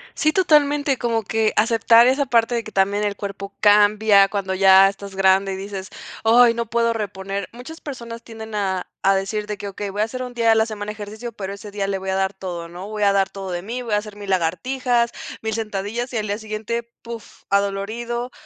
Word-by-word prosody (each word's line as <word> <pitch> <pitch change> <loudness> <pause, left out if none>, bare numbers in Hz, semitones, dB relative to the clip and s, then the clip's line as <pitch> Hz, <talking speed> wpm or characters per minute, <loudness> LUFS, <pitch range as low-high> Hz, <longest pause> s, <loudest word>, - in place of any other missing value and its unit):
Sí, 310 0 +2
totalmente. 295 -5 +3
Como 230 -2 -1
que 220 +2 0
aceptar 230 +1 +5
esa 275 +2 +2
parte 235 -1 +2
de 230 - -1
que 215 - -10
también 200 +2 +1
el 205 -1 -1
cuerpo 200 -1 -6
cambia 205 -1 +5
cuando 195 -2 -2
ya 190 0 +7
estás 195 0 -9
grande, 195 0 +3
y - - -3
dices: 195 0 -6 0.3
"Ay, 235 +1 +6
no 235 0 -2
puedo 230 0 +2
reponer". 195 -2 -4
Muchas 255 +8 -10
personas 235 -5 -8
tienden 220 -1 -9
a 190 -3 -1 0.2
a 195 0 +4
decir 210 +2 -2
de 210 -1 -4
que: 200 - -6
"Okey, 200 +1 -5
voy 205 +2 -2
a - - +4
hacer 255 +3 -6
un 250 -1 -7
día 230 -1 +1
de 225 - +6
la 220 0 +3
semana 210 -2 -5
ejercicio, 215 +3 -7
pero 200 -3 -6
ese 205 +1 -10
día 200 -1 -2
le 195 -1 -1
voy 190 0 -5
a 190 - 0
dar 190 +1 0
todo, 175 -3 -6
¿no?, 180 +4 -9
voy 215 -1 -3
a 200 -1 +4
dar 195 -1 +2
todo 195 -2 -7
de 175 0 -3
mí, 235 +6 -5
voy 230 -3 -4
a - - +4
hacer 210 0 -6
mi 205 - -8
lagartijas, 235 +8 0 0.3
mil 220 0 -2
sentadillas", 220 +3 -3
y 240 - -2
al 215 -1 -2
día 205 +1 -1
siguiente, 220 +2 -4 0.2
puf, 230 -1 -10
adolorido, 220 +5 -1
210 Hz, 225 wpm, -21 LUFS, 195-235 Hz, 0.3 s, ya